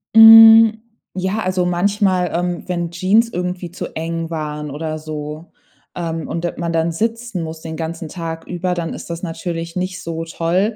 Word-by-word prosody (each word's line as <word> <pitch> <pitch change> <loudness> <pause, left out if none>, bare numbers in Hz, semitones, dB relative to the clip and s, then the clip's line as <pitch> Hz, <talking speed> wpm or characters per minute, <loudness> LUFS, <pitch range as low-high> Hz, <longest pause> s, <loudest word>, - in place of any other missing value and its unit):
Hm. 225 0 +9 0.3
Ja, 190 +3 -2
also, 185 -3 0
manchmal, 185 0 +1
ähm, 175 0 -2
wenn 175 -2 -2
Jeans 190 +7 +2
irgendwie 180 -2 -4
zu - - -7
eng 165 0 -3
waren 150 -2 -4
oder 155 +2 -4
so, 155 +1 -7 0.4
ähm, 165 -2 -4
und 170 +1 -3
da 175 - -2
man 170 -1 -2
dann 165 0 0
sitzen 230 0 -2
muss 160 0 -7
den 160 0 -6
ganzen 165 0 -5
Tag 165 0 -6
über, 180 0 -2
dann 170 -2 -3
ist - - -9
das 170 0 -5
natürlich 165 0 -5
nicht 185 0 -3
so 165 0 -4
toll. 175 +6 -1
175 Hz, 175 wpm, -19 LUFS, 165-185 Hz, 0.4 s, Hm